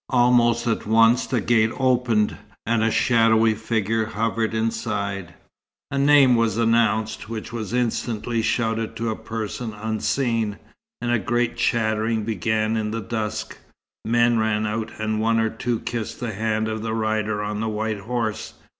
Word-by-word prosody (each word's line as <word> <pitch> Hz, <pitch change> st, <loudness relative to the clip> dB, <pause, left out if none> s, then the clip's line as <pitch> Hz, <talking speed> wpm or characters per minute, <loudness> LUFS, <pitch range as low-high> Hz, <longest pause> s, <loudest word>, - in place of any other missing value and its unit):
Almost 120 Hz, -2 st, +3 dB
at 115 Hz, -3 st, -1 dB
once 115 Hz, +3 st, +4 dB
the 130 Hz, -, 0 dB
gate 110 Hz, 0 st, +3 dB
opened, 125 Hz, -5 st, +2 dB, 0.3 s
and 115 Hz, 0 st, +1 dB
a 115 Hz, -, +3 dB
shadowy 115 Hz, -1 st, +3 dB
figure 110 Hz, 0 st, -1 dB
hovered 110 Hz, +1 st, -1 dB
inside. 105 Hz, -5 st, -2 dB, 0.6 s
A 140 Hz, -, -1 dB
name 140 Hz, -3 st, +6 dB
was 115 Hz, -2 st, +1 dB
announced, 110 Hz, -2 st, +1 dB
which 115 Hz, 0 st, -6 dB
was 110 Hz, -4 st, -4 dB
instantly 120 Hz, -1 st, -1 dB
shouted 115 Hz, 0 st, -1 dB
to 115 Hz, 0 st, -2 dB
a -, -, -3 dB
person 110 Hz, 0 st, -5 dB
unseen, 110 Hz, 0 st, -1 dB, 0.4 s
and 120 Hz, -, -1 dB
a 120 Hz, -, +2 dB
great 120 Hz, +4 st, 0 dB
chattering 110 Hz, -1 st, 0 dB
began 110 Hz, +1 st, 0 dB
in 110 Hz, -1 st, -1 dB
the 115 Hz, +1 st, -3 dB
dusk. 110 Hz, -1 st, -4 dB, 0.4 s
Men 120 Hz, 0 st, +3 dB
ran 110 Hz, -1 st, +1 dB
out, 110 Hz, +1 st, -2 dB
and 110 Hz, 0 st, -1 dB
one 115 Hz, 0 st, +2 dB
or 110 Hz, -1 st, +1 dB
two 115 Hz, 0 st, -2 dB
kissed 115 Hz, -3 st, -4 dB
the 115 Hz, -3 st, -3 dB
hand 110 Hz, +1 st, -1 dB
of 110 Hz, 0 st, -3 dB
the 110 Hz, 0 st, -2 dB
rider 110 Hz, -1 st, -1 dB
on 105 Hz, 0 st, -3 dB
the 110 Hz, 0 st, -1 dB
white 110 Hz, 0 st, -2 dB
horse. 110 Hz, 0 st, -3 dB
110 Hz, 155 wpm, -23 LUFS, 110-115 Hz, 0.6 s, name